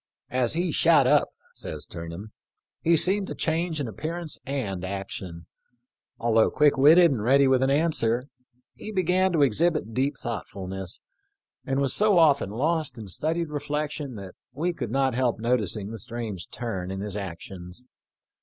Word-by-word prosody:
" - - -54
As 120 - +2
he 170 +1 0
shot - - +4
up," - - +4 0.2
says - - -7
Turnham, 85 +5 -8 0.3
" - - -55
he 165 0 +4
seemed 190 +4 +2
to - - -5
change 165 0 -1
in 140 - -2
appearance 160 - -4
and 105 -10 -3
action. 95 -3 -6 0.7
Although 115 -1 +3
quick 150 -1 +3
witted 160 +5 +7
and 120 -6 -1
ready 135 +5 +4
with 130 -1 +3
an 135 - +2
answer, 135 -6 +1 0.5
he 215 - -8
began 185 -1 +2
to 155 -4 +4
exhibit 140 -2 +1
deep 135 +3 0
thoughtfulness, 95 -5 -5 0.7
and 135 0 0
was 140 -2 +1
so 210 -2 +3
often 145 - +4
lost 155 +7 -1
in 110 -4 -8
studied 160 - -1
reflection 150 -3 -3 0.3
we 165 +7 -1
could 125 -8 -5
not 135 +1 +1
help 120 -2 0
noticing 110 -3 0
the 115 - -7
strange 110 -4 -5
turn 95 -7 -4
in 95 0 -4
his 105 -1 -4
actions. 95 +2 -7
130 Hz, 160 wpm, -26 LUFS, 105-155 Hz, 0.7 s, witted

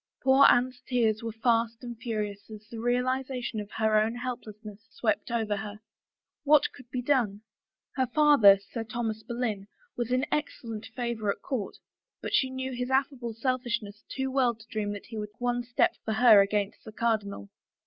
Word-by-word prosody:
Poor 265 +1 +6
Anne's 250 +1 +2
tears 225 -4 +1
were 230 0 -4
fast 230 +1 0
and 240 -1 -6
furious 215 -3 -4
as 215 -1 -11
the 230 - -8
realiza 250 +2 0
tion 225 -2 -3
of 205 -1 -6
her 220 0 +2
own 225 +2 -1
helplessness 220 -4 -7
swept 215 -2 -1
over 220 -3 0
her. 210 0 -6 0.6
What 300 0 +4
could 255 -3 -15
be 250 0 -3
done? 235 -7 +1 0.6
Her 260 -1 +2
father, 260 -8 +6
Sir 230 - -3
Thomas 225 -1 -3
Boleyn, 225 -5 -3 0.3
was 240 0 -3
in 255 +2 +2
excellent 230 -7 -3
favor 235 -4 -2
at - - -8
court 245 -8 -3 0.4
but - - -6
she 260 - +3
knew 260 0 -4
his 250 0 -3
affable 265 -3 0
selfish 255 0 0
ness 205 0 -11
too 265 0 -3
well 255 -3 +2
to 220 0 -16
dream 210 -2 -2
that 205 - -8
he 225 -2 -7
would 210 0 -6
take - - -41
one 245 0 0
step 245 +1 +2
for 220 - -2
her 220 -2 +7
against 200 0 -1
the 220 - -10
cardinal. 210 - -1
230 Hz, 185 wpm, -28 LUFS, 215-250 Hz, 0.6 s, her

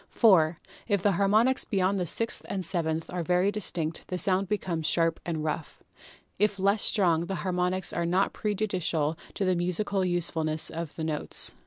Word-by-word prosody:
4. 170 -8 +4 0.3
If 200 -4 0
the 205 - +4
harmonics 215 +7 +3
beyond 195 -1 0
the 180 - -1
sixth 230 +7 0
and 190 -2 -2
seventh 165 -2 -1
are 180 0 -2
very 180 +4 +2
distinct 165 -6 -2
the 180 - -3
sound 190 +1 +2
becomes 175 -6 -1
sharp 165 -1 +2
and 160 -3 -2
rough. 155 0 -4 0.6
If 205 0 +2
less 200 +2 +2
strong, 170 -4 +2
the 195 - -3
harmonics 180 0 +1
are 170 0 -1
not 185 +3 +1
prejudicial 185 -7 -1 0.2
to 195 - -1
the 185 -1 +2
musical 185 +3 -1
usefulness 165 -3 0
of 165 -2 -6
the 160 - -5
notes. 155 -2 -1
180 Hz, 170 wpm, -27 LUFS, 165-200 Hz, 0.6 s, 4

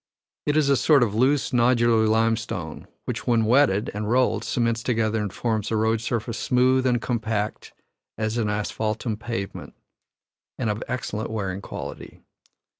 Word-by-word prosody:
It 150 +1 +2
is 150 -2 +3
a 140 - +4
sort 140 +1 +4
of 105 -4 -1
loose 130 +5 +2
nodular 120 -3 +3
limestone, 110 -7 -1 0.2
which - - -4
when 115 -2 +3
wetted 110 -4 +3
and 105 +1 -3
rolled 120 -3 +2
cements 115 -1 0
together 110 -2 0
and 105 -2 -3
forms 110 -2 -2
a 115 - 0
road 110 +1 +1
surface 115 -1 -3
smooth 130 +1 +3
and 120 -1 +2
compact 110 -3 -2 0.5
as 110 +2 -1
an 110 -2 0
asphaltum 110 +2 -2
pavement, 115 -4 -6 0.8
and 115 -4 0
of 105 - -4
excellent 120 -3 -3
wearing 100 -4 -3
quality. - - -8
115 Hz, 150 wpm, -24 LUFS, 110-120 Hz, 0.8 s, a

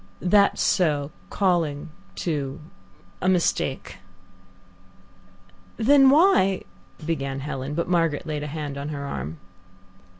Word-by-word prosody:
"That's 200 +2 +3
so, 150 -6 +1 0.2
calling 165 -6 0 0.2
too 140 - -3 0.6
a 185 - +2
mistake." 170 - 0 1.8
"Then 270 +3 +6
why 280 - +4 0.2
?" 155 - -17
began 140 -4 -2
Helen, 135 0 -5
but 170 - -1
Margaret 165 -3 +1
laid 150 -2 -3
a 150 - -4
hand 145 -2 -5
on 140 +2 -5
her 140 -2 -5
arm. 75 - -5
155 Hz, 110 wpm, -24 LUFS, 140-180 Hz, 1.8 s, Then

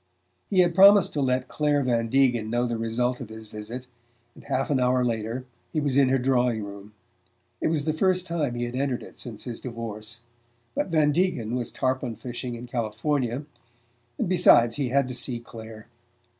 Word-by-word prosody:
He 185 -2 +4
had 175 -1 +2
promised 195 +1 +7
to 145 - -1
let 130 -1 +1
Clare 145 -1 +1
Van 115 -2 0
Degen 125 -4 +2
know 120 +2 +1
the 120 -1 -2
result 120 +3 -1
of 120 - -7
his 110 0 -10
visit, 110 +5 -7 0.5
and - - -15
half 135 +3 -1
an 135 - +2
hour 125 0 +2
later 115 +2 -2 0.3
he 155 - 0
was 145 -3 0
in 135 -2 +5
her 135 - +3
drawing 125 -3 +1
room. 100 +1 -10 0.7
It - - +1
was 155 -2 0
the 155 - +1
first 185 +2 +2
time 155 -8 -1
he 120 - -2
had 120 +1 -4
entered 130 -2 -1
it - - -12
since 115 -4 -6
his 120 -3 -6
divorce; 115 -2 -6 0.5
but - - -1
Van 155 -4 +3
Degen 145 - 0
was 125 -2 -2
tarpon 130 -2 -1
fishing 120 +1 -6
in 120 +1 -8
California 120 +3 -2 0.7
and - - -1
besides, 135 -10 +5
he 135 -4 0
had 135 +1 +2
to 125 - -5
see 125 -1 -2
Clare. 110 -2 -11
125 Hz, 190 wpm, -26 LUFS, 115-140 Hz, 0.7 s, promised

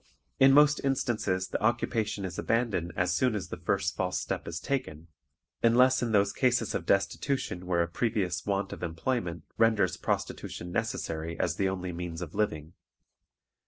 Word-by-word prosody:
In 135 0 +7
most 150 +1 +5
instances 110 -8 0
the - - -3
occupation 110 -2 0
is 90 - -5
abandoned 110 -7 0
as 90 -1 +1
soon 125 +4 +2
as 100 - -4
the - - -5
first - - -1
false - - -1
step - - -4
is 85 -1 -4
taken, 85 - -3 0.5
unless 125 +3 +5
in 120 -2 -1
those 100 -1 +3
cases 120 -4 +1
of - - -3
destitution 100 -1 0
where 85 -2 +2
a - - -3
previous 90 -1 -1
want 100 0 -1
of - - -9
employment 85 - -2 0.2
renders 115 -2 +3
prostitution 90 +1 -3
necessary 80 -1 -3
as 85 -2 0
the 95 -1 +2
only 90 -1 -3
means 85 0 -5
of 80 - -8
living. 80 -6 -2
100 Hz, 160 wpm, -29 LUFS, 85-120 Hz, 0.5 s, In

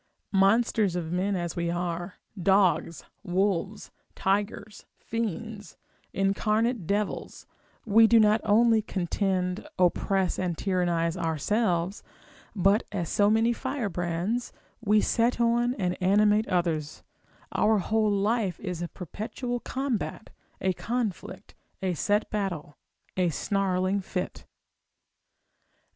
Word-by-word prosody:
Monsters 200 0 +3
of 165 -2 -3
men 190 +3 0
as 175 -2 -3
we 170 -1 -1
are, 175 +1 -3 0.3
dogs, 185 -3 +2 0.2
wolves, 195 +1 -1 0.2
tigers, 205 +1 -2
fiends, 225 -3 -5 0.3
incarnate 215 +1 0
devils, 205 +1 -2 0.4
we 225 +1 +6
do 230 0 +6
not 215 0 +4
only 225 +1 +4
contend, 185 -1 -2
oppress, 185 +1 +1
and 175 -3 -1
tyrannise 175 -3 0
ourselves, 175 +3 0 0.5
but 195 +3 +3
as 175 -6 -3
so 205 -1 +3
many 225 +2 +3
firebrands, 215 -4 -2 0.3
we 210 0 +4
set 235 +1 +1
on, 240 +1 +2
and 180 -5 -1
animate 210 +3 +3
others: 170 -5 -1 0.5
our 220 0 +3
whole 215 +3 +1
life 205 -2 0
is 180 -4 -5
a 175 - -2
perpetual 220 - -5
combat, 255 -4 -3 0.3
a 190 0 +1
conflict, 230 0 -4 0.3
a 185 -1 +1
set 205 +6 +1
battle, 190 -8 -3 0.4
a 180 -2 +2
snarling 190 +2 0
fit. 180 0 -5
195 Hz, 110 wpm, -27 LUFS, 180-220 Hz, 0.5 s, we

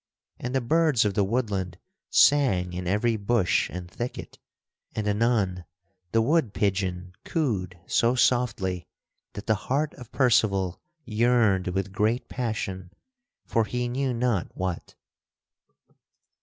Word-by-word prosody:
And 125 +2 -4
the 130 - +2
birds 150 -2 +3
of 105 - +1
the 100 - +2
woodland 100 -5 -1 0.3
sang 95 -12 +4
in 90 0 -4
every 110 +4 +1
bush 100 -2 +1
and 90 -1 -6
thicket; 120 +7 -6 0.6
and, 110 -1 -2
anon, 105 -4 +1 0.5
the 115 0 +3
wood 145 -5 +1
pigeon 95 -3 -1
cooed 95 - -2
so 120 +6 +2
softly 100 -8 +1 0.5
that 100 - -7
the 110 - +3 0.2
heart 145 +3 +1
of 125 -3 -11
Percival 100 -8 +2 0.2
yearned 110 -5 +2
with 95 +1 -2
great 110 +5 0
passion 95 -7 -3 0.6
for 115 -1 +1
he 125 +2 -2
knew 130 +2 -1
not 120 -5 0
what. 95 -2 -4
110 Hz, 125 wpm, -26 LUFS, 95-125 Hz, 0.6 s, sang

